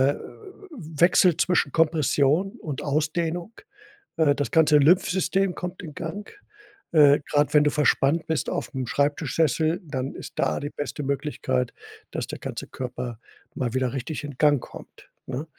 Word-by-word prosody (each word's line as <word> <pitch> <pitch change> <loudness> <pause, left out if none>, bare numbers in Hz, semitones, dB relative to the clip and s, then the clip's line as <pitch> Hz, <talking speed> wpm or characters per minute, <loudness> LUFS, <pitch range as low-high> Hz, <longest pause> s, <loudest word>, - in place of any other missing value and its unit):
w 310 - -11
wechselt 175 -1 +5
zwischen 175 -6 +2
Kompression 155 +2 +2
und 145 -4 -5
Ausdehnung. 160 +6 -1 0.7
Äh, 155 -3 +4
das 145 - -2
ganze 150 -2 +5
Lymphsystem 185 +4 +3
kommt 180 0 -6
in 155 -4 -8
Gang. 170 +7 -6 0.6
Äh, 145 -2 +6
grad 145 0 +2
wenn 150 - +6
du - - +4
verspannt 150 +2 +2
bist 160 -1 -1
aufm 130 -3 -4
Schreibtischsessel, 155 +4 +1
dann 135 -4 -4
ist - - -9
da 75 - +1
die 145 +1 -4
beste 145 0 -5
Möglichkeit, 140 - -2 0.4
dass - - -3
der - - -7
ganze - - -6
Körper 125 -2 -6 0.4
mal 125 -3 -2
wieder 130 -1 0
richtig 140 +4 -4
in 145 -2 -7
Gang 145 -3 +4
kommt, - - -13 0.2
ne? 135 +4 -4
150 Hz, 145 wpm, -25 LUFS, 140-170 Hz, 0.7 s, Äh